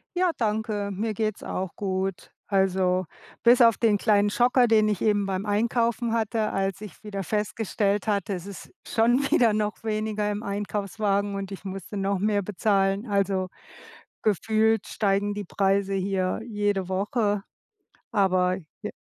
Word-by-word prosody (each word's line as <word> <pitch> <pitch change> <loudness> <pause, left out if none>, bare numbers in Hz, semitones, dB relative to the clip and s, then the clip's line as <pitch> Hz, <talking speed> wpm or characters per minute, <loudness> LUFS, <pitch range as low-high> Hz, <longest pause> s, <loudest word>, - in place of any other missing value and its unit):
Ja, 360 -1 +2
danke. 215 -2 -1
Mir 215 +3 -2
geht's 215 0 -2
auch 185 -1 -4
gut. 190 -1 -3
Also, 185 -2 +1 0.4
bis 240 +1 +6
auf 230 -3 +6
den 220 -3 +3
kleinen 205 -1 +3
Schocker, 245 +3 +3
den 215 -1 +4
ich 205 - -1
eben 205 -2 +2
beim 190 +1 -2
Einkaufen 230 +2 0
hatte, 225 -1 0
als 195 +1 -2
ich 210 - -10
wieder 200 -2 -5
festgestellt 210 0 -1
hatte, 200 -1 0
es 180 -1 -5
ist 200 -1 -10
schon 235 +4 +2
wieder 230 -4 +4
noch 210 +1 -2
weniger 215 -1 -1
im 210 +1 -3
Einkaufswagen 200 0 -1
und 195 -1 -4
ich 190 - -9
musste 195 +1 -7
noch 195 -1 0
mehr 205 0 +1
bezahlen. 195 +1 0
Also, 195 -2 0 0.8
gefühlt 220 +1 +2
steigen 205 0 0
die 205 0 -5
Preise 195 +1 +1
hier 190 0 -1
jede 205 -4 -1
Woche, 205 +1 0 0.7
aber 185 -3 +2 0.3
j - - -4
205 Hz, 150 wpm, -26 LUFS, 195-215 Hz, 0.8 s, bis